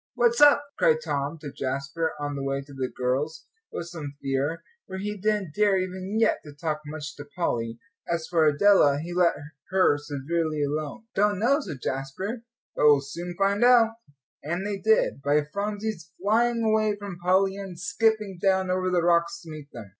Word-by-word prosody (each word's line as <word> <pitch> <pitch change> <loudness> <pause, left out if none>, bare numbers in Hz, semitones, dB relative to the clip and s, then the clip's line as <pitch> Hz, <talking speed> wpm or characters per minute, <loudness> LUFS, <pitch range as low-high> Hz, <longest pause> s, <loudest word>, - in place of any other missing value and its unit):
"What's 475 -1 +2
up?" 290 0 +7 0.2
cried 480 -1 +4
Tom 140 +3 -2
to 145 -3 -6
Jasper, 140 +5 -2
on 145 0 -3
the 140 - -4
way 135 0 -2
to 140 0 -14
the 130 -1 -2
girls 135 +6 -2 0.3
with - - -5
some 155 -5 -7
fear, 140 +4 -2 0.2
for 190 - -6
he 210 +2 -3
didn't 205 -4 -1
dare 205 +1 +3
even 185 +2 -3
yet 225 - +3
to 150 - -11
talk 155 +1 -3
much 150 0 -6
to 145 - -8
Polly. 115 -9 -1 0.3
As 170 -1 -1
for 165 -3 +3
Adela, 150 -2 +5
he 170 +3 -6
let 175 -1 +3 0.3
her 185 -6 +3
severely 150 +2 -2
alone. 150 +9 -3
"Don't 205 0 +2
know," 255 +8 +3
said 150 - -7
Jasper, 135 - -3 0.3
"but - - +2
we'll 145 -2 +6
soon 170 +5 -6
find 200 +2 +2
out," 240 -2 +6 0.5
and 170 +6 -3
they 205 -1 -2
did, 220 -9 +2
by 145 +2 +2
Phronsie's 205 -3 -3
flying 230 +4 +2
away 215 -1 +2
from 200 -3 -8
Polly 190 +2 +2
and 190 -4 -7
skipping 205 -1 0
down 190 -1 +2
over 185 0 0
the 180 -2 +1
rocks 170 0 +2
to 165 - -10
meet 150 -2 -10
them. 115 -3 -9
175 Hz, 185 wpm, -26 LUFS, 145-205 Hz, 0.5 s, up